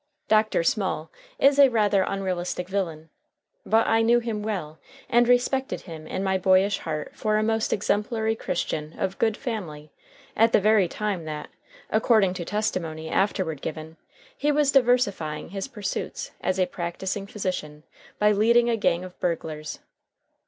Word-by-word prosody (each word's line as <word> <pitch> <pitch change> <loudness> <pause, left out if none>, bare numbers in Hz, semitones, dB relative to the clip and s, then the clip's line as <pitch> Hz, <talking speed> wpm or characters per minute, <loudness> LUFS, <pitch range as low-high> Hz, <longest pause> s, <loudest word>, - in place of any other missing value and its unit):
Dr. 215 -5 +3
Small 185 -3 -1 0.3
is 280 +1 +4
a 275 -1 +8
rather 210 -4 +2
unrealistic 185 -2 -2
villain, 165 -5 -3 0.6
but 225 +1 +4
I 225 0 +3
knew 235 +1 +4
him 230 -3 -2
well 180 -8 -4 0.3
and 240 -1 +4
respected 250 +2 +1
him 160 -3 -10
in 190 - -3
my 190 -1 +1
boyish 190 +2 +3
heart 155 -2 -4
for 215 -1 0
a 215 - +1
most 220 0 0
exemplary 220 +2 0
Christian 155 -6 -3
of 190 0 -3
good 220 -2 +1
family 170 - -5 0.4
at 225 +1 +4
the - - +6
very 210 -2 +4
time 200 -3 -3
that, 150 -1 -6 0.4
according 215 -4 +3
to 180 -2 -5
testimony 170 -7 -2
afterward 180 -7 0
given, 160 +1 -6 0.4
he 295 -11 +1
was 290 -1 +3
diversifying 245 - +1
his 195 +5 -4
pursuits 210 -7 -5
as 185 0 -1
a 185 - +4
practising 185 +3 -4
physician 165 -7 -4 0.3
by 210 0 +4
leading 235 +3 +4
a 230 - +1
gang 180 -4 +1
of 185 -1 -11
burglars. 155 -3 -3
195 Hz, 150 wpm, -25 LUFS, 170-220 Hz, 0.6 s, a